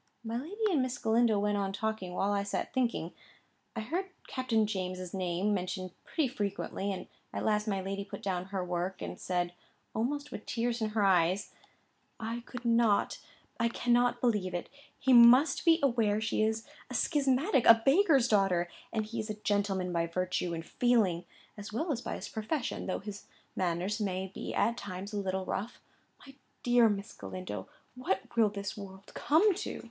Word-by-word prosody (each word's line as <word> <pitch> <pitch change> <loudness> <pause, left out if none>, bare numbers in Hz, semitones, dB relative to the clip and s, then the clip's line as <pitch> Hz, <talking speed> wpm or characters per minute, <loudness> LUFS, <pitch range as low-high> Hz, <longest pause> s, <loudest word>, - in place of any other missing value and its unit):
My 225 0 -4
lady 405 - -1
and 300 -7 +3
Miss 255 -1 -2
Galindo 225 -1 +3
went 205 0 +1
on 195 -1 -1
talking, 200 -3 -3
while 195 +2 +1
I 200 - +1
sat 200 0 -3
thinking. 235 -10 0 0.6
I - - -2
heard 335 - -2 0.2
Captain 235 -4 +1
James's 185 -3 -4
name 185 +2 0
mentioned 185 -1 -3
pretty 310 -4 0
frequently; 200 -3 -3
and 190 - -5 0.3
at - - -3
last 210 0 +1
my 195 -2 0
lady 195 +1 -3
put 200 - -9
down 185 -2 -1
her 190 -1 -3
work, 180 +1 -2
and - - -6
said, 175 -1 -1 0.4
almost 285 +6 -2
with 210 - -8
tears 235 0 -1
in 215 - +1
her 210 - +4
eyes: 185 +1 +3 0.7
"I 230 +1 -3
could 245 -1 -8
not—I 230 0 +1
cannot 245 +1 +2
believe 210 -7 +1
it. 175 - -4 0.3
He 265 -1 +3
must 245 +8 +7
be 330 0 +6
aware 225 -6 +3
she 220 0 0
is 220 +1 0 0.2
a - - -5
schismatic; 275 - +2
a 225 0 +8
baker's 280 - +5
daughter; 195 -5 +2 0.2
and 220 -1 -1
he 230 +2 -5
is 215 0 -4
a 215 - -2
gentleman 200 -3 0
by 170 0 +1
virtue 180 0 -1
and 165 0 -6
feeling, 215 -9 +2 0.3
as 205 +1 -8
well 310 +10 -1
as 245 -4 -2
by - - -4
his - - -6
profession, 240 +5 -3
though 185 - 0
his 205 0 -8 0.3
manners 185 +4 -1
may 190 -1 -2
be - - -5
at 235 +1 +2
times 200 0 -6
a 205 - -1
little 190 -1 -2
rough. 220 +5 -4 0.5
My 270 - -13 0.3
dear 240 -2 +5
Miss 205 +1 -3
Galindo, 95 0 -6 0.2
what 235 -5 -3
will 225 -2 +5
this 200 0 -5
world 195 -1 -10
come 365 +8 +4
to?" - - -4
210 Hz, 180 wpm, -31 LUFS, 190-240 Hz, 0.7 s, a